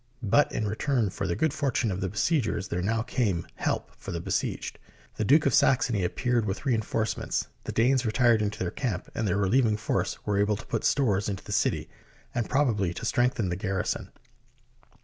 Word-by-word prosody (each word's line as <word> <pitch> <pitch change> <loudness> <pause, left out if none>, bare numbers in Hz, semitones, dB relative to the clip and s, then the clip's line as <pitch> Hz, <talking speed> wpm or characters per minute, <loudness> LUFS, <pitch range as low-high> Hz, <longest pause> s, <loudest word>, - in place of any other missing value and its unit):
But 130 +8 +3
in 110 - -1
return 110 0 0
for 95 - -3
the 85 - 0
good 160 -3 +1
fortune 130 -7 0
of 95 +1 -3
the 95 - -1
be 105 - -11
siegers, 110 - +1
there 90 - -1
now 110 +4 0
came 105 -9 0
help - - -2
for - - -7
the 85 - -3
besieged. 85 - -2 0.4
The - - 0
Duke 145 +8 +5
of 140 - +3
Saxony 120 -6 +3
appeared 120 +6 0
with 100 +8 -4
reinforcements, 110 -3 -1 0.2
the - - -3
Danes 125 +3 +3
retired 115 -1 +3
into 105 -1 -1
their 90 -2 -2
camp, 115 -10 -3
and 110 - -1
the 95 - +1
relieving 110 +4 +3
SIEGE - - -14
OF - - -14
PARIS - - +1
force - - -25
were 100 -1 +1
able 105 +1 +2
to 115 - -10
put 115 - -2
stores 105 -8 +2
into 95 -2 -4
the - - -9
city, - - +1 0.5
and 120 -3 -2
prob 140 +1 +3
ably 95 -5 -1
to - - -5
strengthen 120 -5 +1
the 90 - -1
garrison. 95 0 -2
110 Hz, 210 wpm, -27 LUFS, 95-125 Hz, 0.5 s, Duke